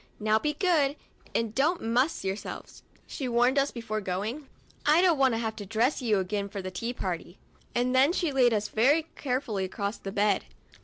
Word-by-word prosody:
" - - -34
Now 215 +1 +5
be 300 +3 -1
good 305 -6 +2 0.4
and 225 -2 0
don't 310 +8 +2
muss 245 +7 0
yourselves," 195 +2 -5 0.2
she 270 - -5
warned 245 +3 +3
us 275 +1 +2
before 215 -3 -4
going; 210 +10 -3 0.4
"I 300 +3 +5
don't 350 -5 +4
want 260 -3 +4
to - - -1
have 220 -1 -2
to 205 - -6
dress 230 +8 +1
you 220 -4 +2
again 200 +2 -2
for 200 - -6
the 185 -1 -5
tea 230 +6 -3
party." 180 -5 -5 0.4
And 245 +1 +1
then 265 +4 +5
she 345 -3 0
laid 255 -3 +4
us 210 -1 0
very 280 +10 +3
carefully 250 -7 -2
across 200 +3 -3
the 195 - -6
bed. 205 +1 +1
235 Hz, 200 wpm, -28 LUFS, 205-275 Hz, 0.4 s, Now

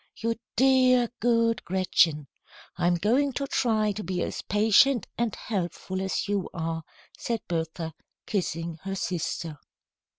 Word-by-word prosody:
"You 230 0 -1 0.2
dear, 255 -1 +5
good 230 -1 +2
Gretchen! 170 -5 +2 0.5
I'm 175 0 +2
going 250 +10 +2
to 275 - -2
try 220 -5 +1
to 210 +1 -5
be 185 -2 -2
as - - -4
patient 220 +4 +4
and 235 -3 -1
helpful 190 -2 -3
as 190 +1 -1
you 200 -2 -1
are," 165 -1 -2 0.4
said 230 -2 -2
Bertha, 165 -1 -3 0.3
kissing 165 -4 -2
her 195 0 -4
sister. 165 -4 -3
195 Hz, 130 wpm, -27 LUFS, 170-230 Hz, 0.5 s, dear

